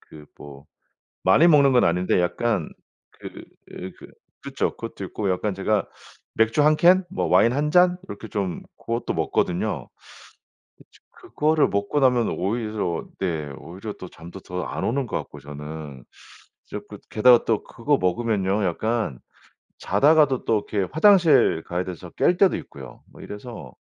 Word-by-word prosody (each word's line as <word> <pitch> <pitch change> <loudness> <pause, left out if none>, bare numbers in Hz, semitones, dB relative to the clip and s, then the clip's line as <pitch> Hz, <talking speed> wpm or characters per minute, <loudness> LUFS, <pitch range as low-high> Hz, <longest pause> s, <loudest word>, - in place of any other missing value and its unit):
그 75 -1 -15
뭐 70 -1 -12 0.6
많이 165 - +5
먹는 140 -4 +5
건 125 - +4
아닌데 90 +2 +1
약간 100 -1 -1 0.4
그 - - -10 0.7
그 - - -13 0.4
그쵸 - - -2
그것도 - - -8
있고 100 -2 -3
약간 95 +2 -1
제가 100 +2 0 0.5
맥주 115 +5 +2
1 155 +1 +5
캔 180 +4 +5
뭐 - - -2
와인 120 +2 +4
1 150 +2 -1
잔 180 +1 +4
이렇게 110 - -8
좀 95 -5 -3 0.2
고것도 115 +1 -3
먹거든요. 90 0 -1 0.9
그쵸. - - -22 0.2
그거를 155 0 0
먹고 100 +8 -1
나면 125 -3 +3
오히려 105 -3 -2 0.2
네 80 -6 -2
오히려 90 +8 -8
또 95 - -10
잠도 85 +3 -12
더 90 0 -5
안 - - -4
오는 135 +2 -1
것 - - -4
같고 75 - -10
저는. 75 -1 -9 0.7
자꾸 - - -8
게다가 120 +2 +5
또 110 -2 0
그거 140 +4 -1
먹으면요, 100 +1 0
약간 105 - -1 0.6
자다가도 145 - +3
또 105 -2 +1
이렇게 100 -3 -1
화장실 160 - +5
가야 90 +1 -2
돼서 90 -1 -8
깰 180 - +2
때도 195 - +4
있고요. - - -11
뭐 - - -14
이래서 115 +3 -9
105 Hz, 275 characters per minute, -23 LUFS, 90-130 Hz, 0.9 s, 많이